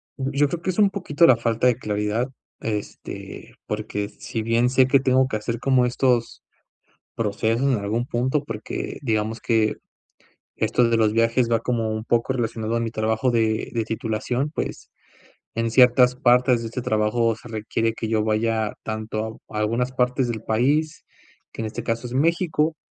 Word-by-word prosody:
Yo 140 +1 +1
creo 170 +3 -4
que 185 - -3
es 185 - -5
un 205 -2 +6
poquito 175 -5 +2
la 130 - +7
falta 115 +1 +1
de 125 - +4
claridad, 105 +2 -1 0.3
este, 105 -2 -6
porque 105 -1 -3
si 115 0 -5
bien 115 +2 +2
sé 130 0 +4
que 140 0 +4
tengo 130 0 +3
que 110 - -2
hacer 115 +2 -4
como 130 -2 +3
estos 125 -1 0 0.7
procesos 115 +4 0
en - - +2
algún 110 +4 -1
punto, 130 +5 0
porque 115 -4 -5
digamos 110 -1 -1
que 110 -2 +1 0.8
esto 120 -1 +2
de 115 - +2
los 110 -1 +3
viajes 115 +2 +2
va 115 -1 +2
como 115 -2 -1
un 110 0 -4
poco 120 +2 +1
relacionado 115 -2 -2
a - - 0
mi 115 -1 -2
trabajo 110 +3 0
de 110 -2 0
de 115 -2 -1
titulación, 115 +5 -2
pues, - - -5 0.6
en 115 0 -1
ciertas 125 0 +6
partes 125 -1 +3
de 115 - -5
este 125 - -4
trabajo 115 0 +1
se 120 - -13
requiere 115 +1 -1
que 110 0 -5
yo 110 -1 +1
vaya 110 0 0
tanto 110 0 -4
a 105 - -5
algunas 115 +4 0
partes 125 0 +1
del 110 -2 -4
país, 145 +8 +1 0.5
que - - -5
en - - -2
este 115 +2 -5
caso 115 +1 -2
es 120 - -7
México, 160 +1 +1
115 Hz, 175 wpm, -23 LUFS, 110-125 Hz, 0.8 s, la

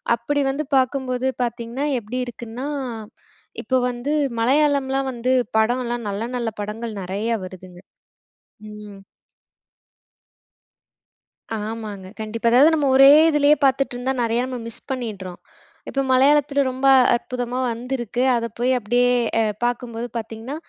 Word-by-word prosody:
அப்பிடி 285 +5 -1
வந்து 295 +3 -3
பாக்கும்போது 260 -1 0 0.2
பார்த்தீங்கன்னா, 240 +3 -3
எப்பிடி 240 +4 -5
இருக்குன்னா, 240 +2 -7 1.0
இப்போ 260 - +1
வந்து 245 +5 -3 0.3
மலையாளம்லாம் 270 0 +2
வந்து, 250 +2 0 0.2
படம்லாம் 240 0 0
நல்ல, 200 +3 -3
நல்ல 235 -2 -1
படங்கள் 220 +2 -5
நெறயா 205 +5 -2
வருதுங்க. 185 -1 -12 0.9
ம். 210 -2 -11 2.6
ஆமாங்க. 215 -4 -6
கண்டிப்பா. 225 +2 -3
அதாவது 290 +7 +6
நம்ம 290 -3 +1
ஒரே 270 +1 +9 0.2
இதுலயே 295 0 +4
பார்த்துட்டு 270 -1 +1
இருந்தா 260 +2 -2
நெறயா 230 +1 0
நம்ம 255 -1 -5
மிஸ் 230 - -8
பண்ணிடுறோம். 200 -8 -5 0.5
இப்ப 275 - -3
மலையாளத்தில 280 +1 +4
ரொம்ப 260 +1 -1 0.3
அற்புதமா 245 +1 -3
வந்திருக்கு. 245 0 -3
அத 230 0 -1
போய் 255 +2 +2
அப்பிடியே 245 +2 +1 0.3
அ - - +4 0.2
பாக்கும்போது 240 -1 -2
பார்த்தீங்கன்னா, 225 +5 -6
245 Hz, 115 wpm, -22 LUFS, 225-265 Hz, 2.6 s, ஒரே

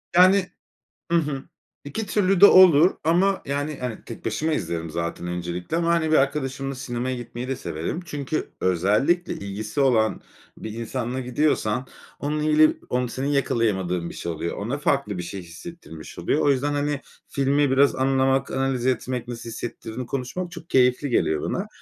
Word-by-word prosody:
Yani, 185 +1 +6 0.6
hı 170 - +4
hı, 145 -4 -2 0.4
2 205 +10 -4
türlü 195 -2 +2
de 205 - +11
olur 180 -2 +7
ama, 185 +4 +2
yani, 145 +1 -2
hani, 125 -3 -5
tek 115 - -9
başıma 155 +9 0
izlerim 85 - -2
zaten 85 +1 -4
öncelikle 90 - -3
ama 170 0 +1
hani 165 -2 +2
bir - - +6
arkadaşımla 135 -1 0
sinemaya 125 0 -3
gitmeyi 120 +1 -6
de 135 - -1
severim 80 - -4
çünkü 145 -1 -3
özellikle 105 - +2
ilgisi 105 +6 -4
olan 115 -5 +3 0.4
bir 110 - -6
insanla 120 +3 -3
gidiyorsan 125 -2 0 0.3
onun 150 +1 -2
ili 155 0 +4
onu 125 -1 0
senin 130 +3 -3
yakalayamadığın 95 -11 0
bir - - -9
şey 85 - -4
oluyor. 80 +2 -4
Ona 120 +8 -3
farklı 140 -9 0
bir - - -3
şey 95 +2 -6
hissettirmiş 85 - -11
oluyor. - - 0
O 145 - +3
yüzden, 140 +2 +1
hani, 145 0 -1 0.3
filmi 140 0 +2
biraz 135 +1 +4
anlamak, 135 0 +2
analiz 130 -2 -1
etmek, 125 -1 -1
nasıl 120 -1 -6
hissettirdiğini 115 +1 -6
konuşmak 140 +8 -4
çok 170 0 -10
keyifli 125 +2 +3
geliyor 80 -9 +1
bana. - - -2
130 Hz, 160 wpm, -24 LUFS, 110-150 Hz, 0.6 s, de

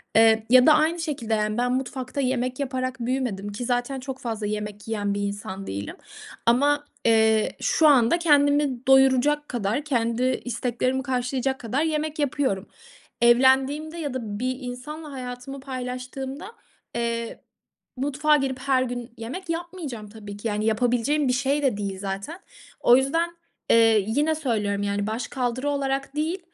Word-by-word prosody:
eee, 225 0 +5
ya 255 +1 +7
da 310 - +8
aynı 315 +3 +2
şekilde, 285 -9 -2
yani, 215 0 0
ben 245 +1 +1
mutfakta 260 +1 -3
yemek 255 0 -1
yaparak 255 -1 -2
büyümedim 240 -5 -2
ki 225 +4 -5
zaten 245 +2 -1
çok 265 0 -6
fazla 225 -3 -4
yemek 210 0 -5
yiyen 205 -2 -1
bir 205 - -2
insan 200 -1 -5
değilim 100 +1 -5 0.5
ama, 290 +5 +3 0.2
eee, 220 -1 +4
şu 315 - +4
anda 275 +3 +5
kendimi 285 -5 +3
doyuracak 265 +2 +4
kadar, 230 +2 -1
kendi 235 -4 0 0.2
isteklerimi 250 +2 -1
karşılayacak 260 0 -1
kadar 250 +6 -1
yemek 310 -1 -2
yapıyorum. 260 -8 0 0.5
Evlendiğimde 265 +6 +4
ya 295 -5 -3
da 215 -5 -4
bir 255 +1 -1
insanla 285 +5 -7
hayatımı 250 +1 -7
paylaştığımda, 260 +4 -5 0.5
eee, 235 -1 -3 0.5
mutfağa 290 +3 +2
girip 265 -2 -2
her 265 -1 +2
gün 245 -1 -5
yemek 300 +11 -7
yapmayacağım 330 - -5
tabii 205 -1 -9
ki. 205 - -4
Yani, 210 0 -1
yapabileceğim 245 +6 +1
bir 250 - +2
şey 275 +3 +1
de 255 -7 +2
değil 200 -2 -4
zaten. 200 - -5 0.4
O 245 - +6
yüzden, 330 +6 +1 0.4
eee, 225 -2 +5
yine 295 +8 +1
söylüyorum, 210 -9 -1
yani, 200 0 -1
başkaldırı 250 +4 -2
olarak 275 0 -2
değil 320 +5 -1
255 Hz, 145 wpm, -25 LUFS, 225-280 Hz, 0.5 s, da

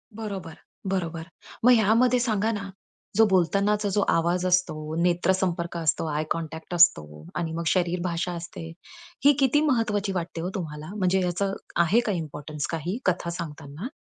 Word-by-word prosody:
बरोबर, 195 -7 -6 0.4
बरोबर. 170 -4 -2 0.4
मग 250 - +8
ह्यामध्ये 230 +3 +4
सांगा 220 -2 +1
ना 200 -3 -4 0.5
जो 225 +2 +6
बोलतानाचा 200 +3 +2
जो 205 +1 +1
आवाज 175 +2 +1
असतो, 160 -4 0
नेत्र 175 +1 +2
संपर्क 175 -2 -2
असतो, 165 -1 0
आय 150 +1 0
कॉन्टॅक्ट 160 +1 -4
असतो 75 - +3
आणि 165 -1 -2
मग 170 +1 -3
शरीर 180 0 +1
भाषा 180 0 -1
असते. 170 -1 -7 0.6
ही 290 - +8
किती 275 +2 +4
महत्त्वाची 225 -8 +1
वाटते 170 -2 -3
हो 175 - -2
तुम्हाला 155 -4 -5
म्हणजे 190 -2 +2
याच 175 0 -2 0.3
आहे 175 +7 +4
का 215 - +1
इम्पोर्टन्स 150 -3 -4
काही 170 +5 -2
कथा 180 -1 0
सांगताना? 155 - -6
180 Hz, 155 wpm, -26 LUFS, 165-205 Hz, 0.6 s, मग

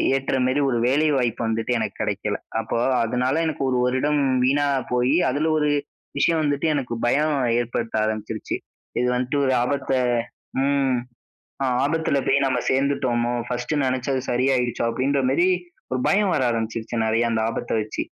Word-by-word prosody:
ஏற்றமாரி 130 0 0
ஒரு 120 - 0
வேலைவாய்ப்பு 135 -5 +1
வந்துட்டு 115 +2 -1
எனக்கு 110 -2 -3
கிடைக்கல. 105 0 -2 0.2
அப்போ 110 - -3 0.3
அதனால 125 +4 0
எனக்கு 155 -3 -2
1 125 - +1
வருடம் 145 +3 +1 0.2
வீணா 145 +3 +2 0.3
போயி, 125 +4 +2
அதுல 150 +4 0
ஒரு 150 0 +2 0.5
விஷயம் 165 0 +3
வந்துட்டு 145 +2 0
எனக்கு 130 -4 -2
பயம் 150 +4 +2 0.2
ஏற்படுத்த 115 -1 -3
ஆரம்பிச்சிருச்சு. 110 0 -3 0.4
இது 125 - +1
வந்துட்டு 125 +3 -1
ஒரு 130 - +2
ஆபத்த 135 +1 -2 0.7
ம் 135 -3 +2 0.7
அ - - +2 0.2
"ஆபத்தில 155 -2 +1
போய் 140 - +4
நம்ம 130 - +1
சேர்ந்துட்டோாமோ! 130 -3 +1 0.2
பர்ஸ்ட்டு 125 +4 -1
நினச்சது 130 +1 -1
சரியாகிடுச்சோ!" 125 -1 +1
அப்பிடின்றமாரி 135 +6 +1 0.5
ஒரு 130 - 0
பயம் 200 -1 +3
வர - - +1
ஆரம்பிச்சிருச்சு. 115 0 -3
நிறைய 115 +1 +2
அந்த 115 - 0
ஆபத்த 120 - -4
வச்சு. 105 - -3
130 Hz, 140 wpm, -23 LUFS, 120-140 Hz, 0.7 s, போய்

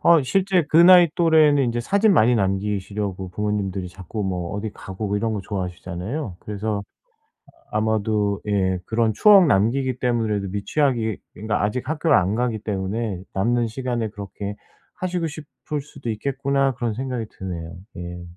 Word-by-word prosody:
아 170 -2 +6
실제 185 +5 +2
그 155 - +2
나이 175 +1 +8
또래는 155 -5 +4
이제 120 0 -1
사진 200 - +3
많이 120 - +4
남기시려고 100 -1 -2
부모님들이 100 -2 -2
자꾸 95 +4 -6
뭐 90 -3 -3
어디 105 +2 -3
가고 95 +3 -6
뭐 100 - 0
이런 110 +2 -1
거 105 - -2
좋아하시잖아요. 95 - -5
그래서 105 0 -3 0.9
아마도 105 -2 0
예 95 -3 +1
그런 115 -1 +1
추억 195 - +7
남기기 125 +4 +1
때문에라도 110 -5 0
미취학이 110 +2 0 0.2
그니까 105 +2 -2
아직 120 +5 -2
학교를 160 +1 +3
안 95 +3 +1
가기 120 -2 -1
때문에 100 -1 -3
'남는 120 +4 +1
시간에 120 -1 -2
그렇게 100 0 -6 0.4
하시고 180 -2 -2
싶을 150 -1 -6
수도 140 -3 -8
있겠구나.' 135 +4 0
그런 120 -2 -2
생각이 125 -1 -3
드네요. 85 -3 -6 0.2
예. 90 0 -7
110 Hz, 355 characters per minute, -23 LUFS, 100-135 Hz, 0.9 s, 나이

